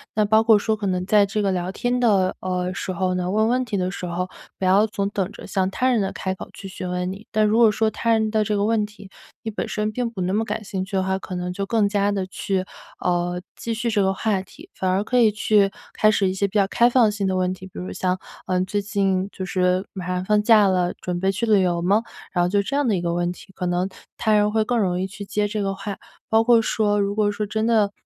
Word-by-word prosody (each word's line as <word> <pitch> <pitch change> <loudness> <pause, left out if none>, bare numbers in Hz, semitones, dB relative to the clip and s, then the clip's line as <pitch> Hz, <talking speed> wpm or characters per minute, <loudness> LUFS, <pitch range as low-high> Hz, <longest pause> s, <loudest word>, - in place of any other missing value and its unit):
那 215 - +3
包 220 +1 +4
括 220 -1 +6
说 220 +1 0
可 205 -2 -3
能 180 -1 -1
在 205 +1 +4
这 205 +2 -2
个 200 -1 +1
聊 180 -1 -2
天 245 +5 -1
的， 200 -6 +3
呃， 180 0 -2
时 190 -1 -4
候 185 +1 0
呢， 180 0 -1
问 215 +3 +2
问 255 +1 +1
题 220 -4 -3
的 185 -1 -1
时 185 - -6
候， 180 +1 -3 0.3
不 - - -7
要 195 +4 +4
总 200 -2 -2
等 195 -2 -2
着， - - -10
先 195 - -3
让 185 - +1
他 255 +6 0
人 240 - +2
来 195 - -2
开 190 - -3
口 190 - -9
去 - - -11
询 185 -1 -6
问 180 0 -2
你。 200 +3 -10
但 215 0 +3
如 215 +1 +2
果 230 -2 +7
说 220 +1 +1
他 230 - -3
人 220 -1 +1
的 215 -1 +1
这 210 - 0
个 200 - +1
问 215 0 +2
题， 210 -2 -13 0.3
你 220 - -3
本 210 - -3
身 215 0 -2
并 240 +2 -2
不 215 -5 -6
那 180 +1 0
么 215 +3 +1
感 215 0 -4
兴 190 -2 -4
趣 195 +1 -6
的 190 - +2
话， 190 0 -1
可 185 - -7
能 180 0 -3
就 195 +2 -3
更 215 -1 +2
加 200 -1 +1
地 195 -2 -1
去， 190 0 -2 0.4
呃， 175 0 0 0.2
继 230 - -3
续 230 +1 -1
这 210 -1 +2
个 190 0 +2
话 200 -1 0
题。 300 - -15
反 185 - -2
而 190 +2 +1
可 250 +3 0
以 230 -2 +6
去 210 -1 +2 0.2
开 215 - +4
始 200 -3 +2
一 - - -2
些 200 +1 0
比 200 - -2
较 200 - +4
开 235 +4 +3
放 240 -3 +4
性 205 -2 -2
的 190 - 0
问 185 0 +1
题， 185 0 -10
比 - - -19
如 180 - -5
像， 185 0 -1 0.3
呃， 180 0 0
“最 205 +2 -1
近 195 -2 0
就 190 - -6
是 185 0 +1
马 185 -2 -7
上 180 0 -1
放 210 +2 +2
假 215 -2 +6
了， 180 -1 +1
准 180 -1 -3
备 190 +2 +1
去 220 +4 -1
旅 210 -3 +4
游 175 -1 0
吗？” 200 +5 +3 0.3
然 175 -1 +1
后 - - +1
就 200 +2 +2
这 275 +8 -2
样 290 -2 +1
的 215 - +2
一 175 - -1
个 170 -1 -1
问 175 0 0
题， 195 - -15
可 180 - -2
能 180 +1 0 0.3
他 220 - +1
人 210 0 +4
会 220 0 +3
更 240 +2 0
容 180 -3 0
易 - - 0
去 200 +1 -8
接 205 +1 -1
这 210 0 -2
个 195 -1 -1
话。 200 0 -6 0.3
包 220 0 +4
括 235 -1 +6
说 210 -2 +1
如 200 0 0
果 210 -1 +2
说 210 +1 -3
真 220 +2 -1
的， 215 -3 +3
200 Hz, 305 characters per minute, -23 LUFS, 185-215 Hz, 0.4 s, 果